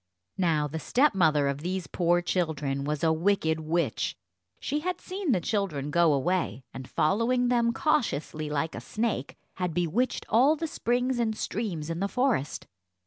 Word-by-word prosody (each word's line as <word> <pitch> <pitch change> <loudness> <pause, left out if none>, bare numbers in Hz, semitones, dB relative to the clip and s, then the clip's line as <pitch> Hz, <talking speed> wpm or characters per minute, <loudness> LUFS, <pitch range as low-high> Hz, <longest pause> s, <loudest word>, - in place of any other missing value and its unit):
Now, 160 -5 +2
the 160 +3 -5
stepmother 165 - +3
of 140 0 -1
these 180 +1 -2
poor 175 0 +1
children 150 -6 -1
was 150 +1 -2
a 160 -1 +4
wicked 160 -2 +1
witch. 165 +2 -1 0.4
She 295 +2 -1
had 360 +3 -3
seen 375 -4 -3
the 190 - +3
children 170 - -2
go 170 0 +4
away, 140 - 0
and, 130 0 -8
following 235 +9 +2
them 235 -1 +3
cautiously 155 - 0
like 150 +2 -1
a - - -6
snake, 215 - -2 0.2
had 180 -3 -2
bewitched 175 +9 0
all 265 +7 +4
the 325 - -3
springs 250 -3 0
and 220 -2 0
streams 170 -8 -3
in 165 - -3
the 200 - 0
forest. 250 - 0
175 Hz, 160 wpm, -28 LUFS, 155-235 Hz, 0.4 s, a